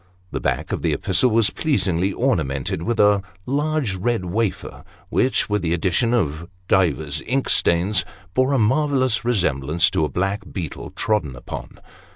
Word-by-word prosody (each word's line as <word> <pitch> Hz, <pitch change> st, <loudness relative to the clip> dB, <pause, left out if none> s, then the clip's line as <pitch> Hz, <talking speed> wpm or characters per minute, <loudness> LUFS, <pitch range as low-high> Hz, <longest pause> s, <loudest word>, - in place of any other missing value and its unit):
The -, -, -3 dB
back -, -, -1 dB
of -, -, -2 dB
the -, -, +1 dB
epistle 110 Hz, +7 st, +2 dB
was 115 Hz, -2 st, +3 dB
pleasingly 95 Hz, -, 0 dB
ornamented 80 Hz, -, -1 dB
with 115 Hz, +5 st, -2 dB
a 105 Hz, -1 st, +5 dB, 0.2 s
large 145 Hz, -4 st, 0 dB
red 110 Hz, 0 st, -1 dB
wafer, 105 Hz, +3 st, -3 dB, 0.3 s
which, 130 Hz, -, +1 dB
with 105 Hz, -1 st, 0 dB
the 85 Hz, -1 st, 0 dB
addition 95 Hz, +7 st, +1 dB
of 85 Hz, -8 st, -1 dB, 0.2 s
divers 80 Hz, -6 st, +1 dB
ink 135 Hz, +2 st, 0 dB
stains, 85 Hz, +2 st, +3 dB, 0.3 s
bore 130 Hz, +5 st, +2 dB
a -, -, +3 dB
marvellous 130 Hz, +1 st, +2 dB
resemblance 85 Hz, -, +1 dB
to -, -, +1 dB
a 75 Hz, -, 0 dB
black 95 Hz, +8 st, -1 dB
beetle 85 Hz, -7 st, -6 dB
trodden 80 Hz, -, -1 dB
upon. 60 Hz, -, -8 dB
100 Hz, 155 wpm, -22 LUFS, 85-120 Hz, 0.3 s, a